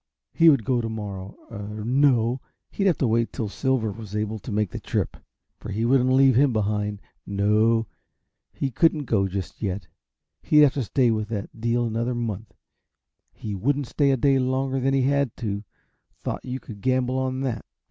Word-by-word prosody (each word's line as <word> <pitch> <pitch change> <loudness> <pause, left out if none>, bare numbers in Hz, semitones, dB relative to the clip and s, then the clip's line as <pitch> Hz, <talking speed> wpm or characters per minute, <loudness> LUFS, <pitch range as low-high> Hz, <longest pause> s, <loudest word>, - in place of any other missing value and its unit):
He 165 0 +6
would 135 -8 +3
go 125 -2 +1
to 115 - -3
morrow 100 -3 -6
er 105 0 -6
no, 125 -1 +3 0.3
he'd 200 - 0
have 180 - +3
to 130 - +1
wait 115 +1 +1
till 110 -5 -3
Silver 130 -2 0
was 105 -1 -8
able 105 +1 -2
to 105 - -8
make 105 -3 0
the - - -5
trip, - - -2 0.4
for - - -8
he 110 +4 -1
wouldn't 130 +1 +3
leave 130 -1 +5
him 135 +2 +4
behind. 105 -1 -1 0.2
No, 105 +3 +2 0.7
he 135 - -3
couldn't 150 +3 +2
go 100 -5 +1
just 95 -1 -5
yet 100 -3 -2 0.6
he'd 150 -1 +5
have 145 -3 +6
to 140 - -1
stay 120 +2 +2
with 110 -1 -2
the 105 -3 -4
deal 120 +1 0
another 115 +2 -1
month. 115 -3 -4 0.8
He 105 - -6
wouldn't 140 +8 0
stay 140 +3 +1
a 135 - +3
day 135 +2 +3
longer 130 +1 0
than 135 +1 +1
he 135 - +2
had 140 -2 +1
to, 100 -3 -3 0.6
thought - - -3
you 130 0 -4
could 105 -6 -11
gamble 130 +2 +1
on 130 0 -2
that. 130 -4 -2
115 Hz, 190 wpm, -25 LUFS, 105-130 Hz, 0.8 s, He